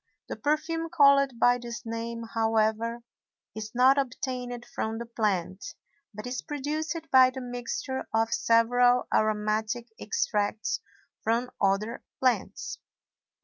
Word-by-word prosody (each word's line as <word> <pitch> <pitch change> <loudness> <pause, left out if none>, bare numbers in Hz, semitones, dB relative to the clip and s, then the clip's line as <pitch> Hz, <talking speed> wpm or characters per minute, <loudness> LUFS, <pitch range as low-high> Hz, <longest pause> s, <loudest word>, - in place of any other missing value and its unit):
The - - -3
perfume 320 +2 -1
called 280 -5 +5
by 245 +1 +4
this 235 -2 -7
name, 230 0 -4
however, 225 +1 +1 0.5
is 215 +1 -7
not 260 +3 +5
obtained 250 -2 -4
from 220 0 -3
the 235 - -5
plant, 205 -5 -1 0.5
but 210 +1 -8
is 250 +1 -3
produced 305 +3 -3
by 260 -1 +8
the 260 +1 -7
mixture 245 +1 -4
of 225 0 +1
several 245 +2 +3
aromatic 215 +2 0
extracts 210 0 -1 0.4
from 235 +3 0
other 200 +4 +1 0.2
plants. 255 -2 -1
235 Hz, 115 wpm, -28 LUFS, 220-255 Hz, 0.5 s, by